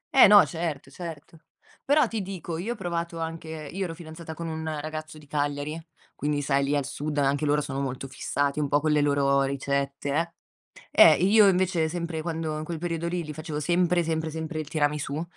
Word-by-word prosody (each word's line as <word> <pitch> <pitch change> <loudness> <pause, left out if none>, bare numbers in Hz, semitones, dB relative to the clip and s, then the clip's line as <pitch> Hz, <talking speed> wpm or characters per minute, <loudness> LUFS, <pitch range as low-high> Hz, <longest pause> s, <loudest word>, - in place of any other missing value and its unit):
Eh 265 - +10
no, 205 0 +8
certo, 160 -5 -4
certo. 165 0 -9 0.4
Però 285 -1 +4
ti 225 -1 -3
dico, 180 -4 -5
io 220 +7 -2
ho - - -10
provato 170 -3 -3
anche 165 0 -5 0.2
io 195 +1 -2
ero 165 -2 -5
fidanzata 160 -1 -9
con 170 0 -5
un 160 0 -4 0.2
ragazzo 155 +1 -6
di 150 - -14
Cagliari, 145 +1 -2 0.4
quindi 145 0 -1
sai 140 0 +2
lì 145 +1 +1
al 140 -2 0
sud 145 +2 -4
a 145 - +3
anche 145 +2 0
loro 150 +1 +3
sono 140 -2 -4
molto 135 0 -4
fissati 140 +2 -1
un 150 - +1
po' 145 +1 +3
con 155 +1 0
le 150 -1 +3
loro 140 -1 +3
ricette, 140 +1 -1
eh 165 +3 0 0.9
Eh, - - -1
io 205 +2 +6
invece 180 -4 +2
sempre 170 -2 -3
quando 160 -2 -3
in 155 - -4
quel 165 +1 -5
periodo 170 0 -2
lì 175 0 -2
gli 155 -1 -7
facevo 155 -1 -5
sempre, 175 +2 +2
sempre, 160 -1 -2
sempre 160 +1 -4
il 155 - -6
tiramisù 150 -1 -1
160 Hz, 205 wpm, -26 LUFS, 145-170 Hz, 0.9 s, Eh